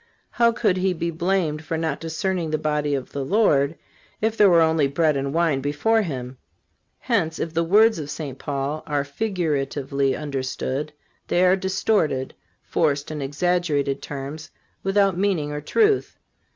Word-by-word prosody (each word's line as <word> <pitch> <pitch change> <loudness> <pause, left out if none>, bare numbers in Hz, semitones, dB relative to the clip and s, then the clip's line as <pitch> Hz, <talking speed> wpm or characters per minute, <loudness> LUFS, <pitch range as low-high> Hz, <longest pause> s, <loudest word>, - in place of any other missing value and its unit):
How 235 -1 +3
could 220 -5 +1
he 185 0 +1
be 170 0 -2
blamed 165 -2 -1
for 160 +1 -3
not 160 -3 -2
discerning 165 +1 -2
the 155 - 0
body 150 -1 0
of 130 -2 -5
the 140 - -3
Lord, 155 -5 +2 0.4
if 220 +1 0
there 205 -3 +6
were 170 -2 +6
only 160 -3 +2
bread 150 +2 +1
and 140 0 -2
wine 160 -4 +1
before 150 +11 +1
him? 130 -8 -5 0.6
Hence, 180 -10 0
if 165 - -3
the 165 0 +1
words 210 +3 +4
of 145 -2 -6
St. 140 -4 -6
Paul 140 +2 -3
are 145 -2 0
figuratively 140 -6 -1
understood, 140 0 -3 0.4
they 180 +1 +3
are 180 +1 +5
distorted, 190 -7 0 0.3
forced 145 -3 0
and 150 -1 -4
exaggerated 145 -1 0
terms, 145 +2 -7 0.3
without 195 -2 +2
meaning 180 -7 0
or 150 0 -4
truth. 425 - +1
155 Hz, 155 wpm, -23 LUFS, 140-185 Hz, 0.6 s, there